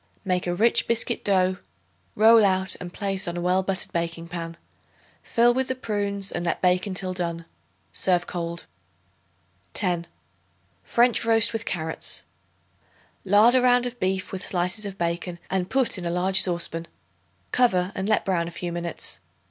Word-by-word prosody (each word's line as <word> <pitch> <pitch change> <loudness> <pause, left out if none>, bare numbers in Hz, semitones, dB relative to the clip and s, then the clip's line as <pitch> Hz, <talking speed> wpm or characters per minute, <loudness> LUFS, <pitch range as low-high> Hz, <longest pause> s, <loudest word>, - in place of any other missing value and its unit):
Make 180 -1 -1
a 175 - -1
rich 225 +5 +2
biscuit 235 -1 -1
dough, 185 -2 +2 0.6
roll 225 +1 +6
out 190 -1 +4
and 175 -1 -7
place 195 -1 -3
on 175 0 -4
a - - -3
well 180 +2 +2
buttered 190 0 -3
baking 170 0 -4
pan. 165 -1 -6 0.6
Fill 240 +1 +3
with 260 +1 -1
the 260 - -2
prunes 200 -4 -1
and - - -3
let 170 - -1
bake 180 +1 +2
until 185 -1 -4
done. 170 -2 -4 0.5
Serve 180 -2 +1
cold. 170 -1 -5 1.1
10. 175 -3 -1 0.8
French 240 0 +2
Roast 225 0 +4
with 225 0 -3
Carrots. 160 -5 -1 1.0
Lard 205 +5 +5
a 255 - +4
round 245 0 +4
of 245 0 -5
beef 190 0 -2
with 190 - -5
slices 185 +4 -1
of 195 -1 -8
bacon 170 +1 -3
and 190 -1 -1
put 260 -7 0
in 175 - -6
a - - -1
large 185 +2 +4
saucepan. 170 -2 0 0.6
Cover 190 -7 +2
and 190 +2 -3
let 215 - +2
brown 175 -4 0
a - - -4
few 175 0 -5
minutes. 170 -1 -3
185 Hz, 165 wpm, -24 LUFS, 175-210 Hz, 1.1 s, roll